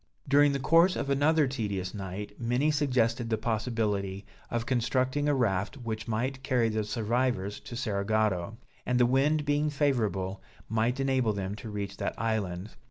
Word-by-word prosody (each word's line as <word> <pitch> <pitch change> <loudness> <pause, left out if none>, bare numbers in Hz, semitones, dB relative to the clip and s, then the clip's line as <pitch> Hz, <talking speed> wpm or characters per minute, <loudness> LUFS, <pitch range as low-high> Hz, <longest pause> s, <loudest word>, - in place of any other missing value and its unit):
During 145 +1 +5
the 140 - -1
course 165 +7 +4
of 140 - -2
another 150 +2 +3
tedious 100 -8 -3
night, 100 0 -6
many 125 +6 +2
suggested 125 -5 +1
the 110 - +1
possibility 105 -4 -1 0.2
of 120 -1 -2
constructing 130 +3 +1
a 145 - +3
raft 105 -1 0
which 110 -3 -5
might 125 +4 -2
carry 125 -4 +2
the 110 0 -1
survivors 110 -1 -1
to 120 - -9
Cerigotto; 110 -3 0 0.3
and 125 0 +1
the 120 - +6
wind 145 +4 +2
being 145 +1 +1
favorable, 110 -10 0 0.3
might 115 +4 0
enable 130 -5 +2
them 100 -1 -3
to 110 - -8
reach 100 -1 -5
that - - -3
island. 105 -3 -2
115 Hz, 160 wpm, -29 LUFS, 105-135 Hz, 0.3 s, the